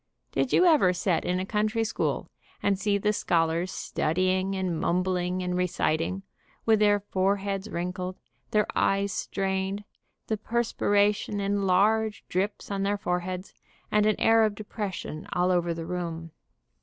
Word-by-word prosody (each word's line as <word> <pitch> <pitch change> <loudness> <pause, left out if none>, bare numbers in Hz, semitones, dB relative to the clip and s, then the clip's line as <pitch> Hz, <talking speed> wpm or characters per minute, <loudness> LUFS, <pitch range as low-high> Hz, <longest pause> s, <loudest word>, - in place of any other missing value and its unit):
Did 260 - 0
you 365 - +5
ever 290 - +5
set 180 -2 0
in 180 +1 0
a 185 - -2
country 215 +2 0
school, 220 - -1 0.4
and 195 -1 +2
see 205 0 +1
the 210 +1 +1
scholars 170 -2 +1
studying, 185 +4 0
and 185 -4 -1
mumbling, 180 0 0
and 180 0 -1
reciting, 180 0 0 0.4
with 220 -1 +4
their 205 -1 +4
fore 195 0 +1
heads 195 +1 -4
wrinkled, 180 +1 -4 0.3
their 210 -1 +2
eyes 195 0 +2
strained, 195 +1 -2 0.4
the 220 - -1
perspiration 205 -2 +1
in 200 0 0
large 215 +3 +2
drops 200 +3 -2
on 195 -1 -1
their 200 +1 +1
foreheads, 180 0 -3 0.4
and 210 0 +4
an 215 - +1
air 225 0 +5
of 215 -2 +1
de 215 - -7
pression 195 -7 -5
all 180 +1 +2
over 175 -1 +1
the 165 0 -4
room. 165 -2 -4
195 Hz, 155 wpm, -27 LUFS, 180-205 Hz, 0.4 s, you